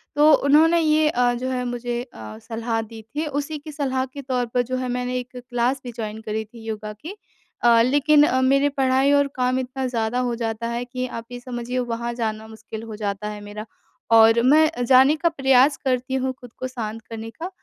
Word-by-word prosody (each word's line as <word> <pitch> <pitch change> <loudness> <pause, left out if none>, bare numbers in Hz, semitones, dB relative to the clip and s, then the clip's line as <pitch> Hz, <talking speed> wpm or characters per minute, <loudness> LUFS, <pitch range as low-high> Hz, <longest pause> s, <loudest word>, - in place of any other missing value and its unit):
तो 300 +1 +6
उन्होंने 320 +4 +5
ये 310 -1 +3
अ, 245 -2 +2
जो 255 +2 -3
है 255 -1 -2
मुझे 240 0 -3
अ, 240 -3 -10
सलाह 225 0 -3
दी 225 0 -10
थी, 290 +9 -5
उसी 290 +1 -3
की 300 +1 -10
सलाह 265 -3 -1
के 285 - -6
तौर 255 -2 -1
पर 250 - +3
जो 255 +1 -3
है 255 0 -3
मैंने 250 0 -2
एक 250 0 -10
क्लास 245 +2 -1
भी 245 - -6
जॉइन 220 -1 -5
करी 220 0 -3
थी 225 +1 -14
योगा 215 -1 -5
की। 315 - -9 0.5
अ, 235 -1 +6
लेकिन 290 +4 +4 0.2
मेरी 275 +2 +3
पढ़ाई 270 0 +2
और 285 0 +4
काम 255 0 +1
इतना 260 +1 -4
ज़्यादा 235 0 -1
हो 235 - -2
जाता 230 0 -3
है 235 +1 -3
कि 255 +1 -4
आप 230 -2 -7
ये 245 - -6
समझिए 245 0 -4
वहाँ 235 -1 -3
जाना 220 -2 -3
मुश्किल 220 0 -9
हो 225 -1 -7
जाता 205 -1 -3
है 210 0 -7
मेरा 205 +1 -8 0.5
और 225 +1 +6
मैं 305 +5 +5 0.2
जाने 265 +4 +6
का 335 +2 +1
प्रयास 270 -2 +3
करती 255 0 0
हूँ 260 - -1
ख़ुद 245 -2 -12
को 255 - -3
शांत 225 -3 -6
करने 225 0 -6
का, 335 +10 -7
245 Hz, 210 wpm, -23 LUFS, 225-270 Hz, 0.5 s, तो